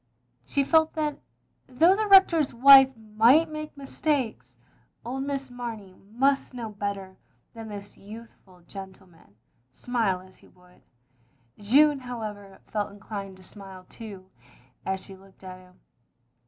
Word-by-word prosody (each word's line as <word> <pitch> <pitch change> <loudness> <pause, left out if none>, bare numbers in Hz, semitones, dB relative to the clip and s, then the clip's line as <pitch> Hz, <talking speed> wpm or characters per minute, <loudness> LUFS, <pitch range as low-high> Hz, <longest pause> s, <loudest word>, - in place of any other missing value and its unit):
She 280 - 0
felt 315 +2 +3
that, 300 -2 -3 0.5
though 325 +9 +4
the 430 +1 -1
Rector's 345 -9 +5
wife 270 +2 +8
might 225 +9 +3
make 305 -1 -7
mistakes, 275 -3 -3 0.5
old 265 +3 -4
Miss 275 -2 -4
Mamey 230 -6 -7 0.2
must 270 +3 0
know 230 -3 -6
better 200 -2 -5 0.4
than 225 -1 -9
this 205 -1 -10
youthful 205 -3 -14
gentleman, 185 - -13 0.4
smile 220 - -1
as 185 0 -18
he - - -20
would. 180 0 -24 0.8
Jeanne, 280 +8 +4
however, 210 -6 -8
felt 210 -2 -3
inclined 200 -1 -8
to 185 - -17
smile 190 -1 -13
too, 195 -4 -11 0.6
as 190 0 -1
she 195 - -12
looked 190 0 -21
at 185 -1 -9
him. 180 0 -21
220 Hz, 130 wpm, -26 LUFS, 195-270 Hz, 0.8 s, wife